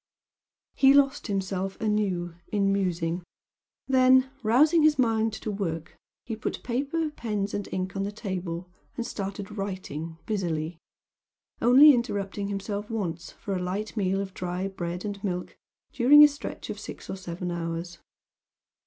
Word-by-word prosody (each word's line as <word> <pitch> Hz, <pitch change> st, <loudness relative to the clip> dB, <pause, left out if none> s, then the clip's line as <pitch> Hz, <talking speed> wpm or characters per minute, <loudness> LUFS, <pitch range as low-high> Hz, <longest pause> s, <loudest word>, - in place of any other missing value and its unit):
He 270 Hz, 0 st, +6 dB
lost 280 Hz, -1 st, +3 dB
himself 195 Hz, -1 st, -2 dB
anew 200 Hz, -5 st, 0 dB
in 200 Hz, -2 st, +1 dB
musing 175 Hz, -3 st, -1 dB, 0.7 s
then, 260 Hz, 0 st, +5 dB
rousing 295 Hz, +9 st, +5 dB
his 305 Hz, -1 st, +5 dB
mind 225 Hz, -3 st, +2 dB
to 220 Hz, -, -4 dB
work, 170 Hz, -5 st, -4 dB, 0.3 s
he 225 Hz, -, -3 dB
put 220 Hz, -, -4 dB
paper, 285 Hz, +6 st, -1 dB
pens 210 Hz, -7 st, -3 dB
and 205 Hz, -1 st, -3 dB
ink 185 Hz, 0 st, -3 dB
on 195 Hz, -, -1 dB
the 200 Hz, +1 st, -2 dB
table, 185 Hz, -5 st, -4 dB, 0.3 s
and 235 Hz, -, -2 dB
started 200 Hz, -1 st, -5 dB
writing 170 Hz, -5 st, -5 dB
busily 170 Hz, -6 st, -2 dB, 0.8 s
only 270 Hz, +6 st, +8 dB
interrupting 205 Hz, -5 st, -2 dB
himself 200 Hz, +1 st, -4 dB
once 180 Hz, -7 st, -3 dB
for 195 Hz, -, -4 dB
a 180 Hz, -, -2 dB
light 195 Hz, +5 st, -3 dB
meal 195 Hz, -2 st, +1 dB
of 190 Hz, -1 st, -6 dB
dry 180 Hz, +1 st, -3 dB
bread 180 Hz, -1 st, -5 dB
and 200 Hz, -1 st, -5 dB
milk 180 Hz, -3 st, -3 dB, 0.4 s
during 290 Hz, +5 st, +8 dB
a -, -, +10 dB
stretch 285 Hz, 0 st, -6 dB
of -, -, -7 dB
six -, -, -9 dB
or -, -, -4 dB
seven 180 Hz, -1 st, -5 dB
hours. 170 Hz, 0 st, -4 dB
200 Hz, 145 wpm, -27 LUFS, 180-230 Hz, 0.8 s, a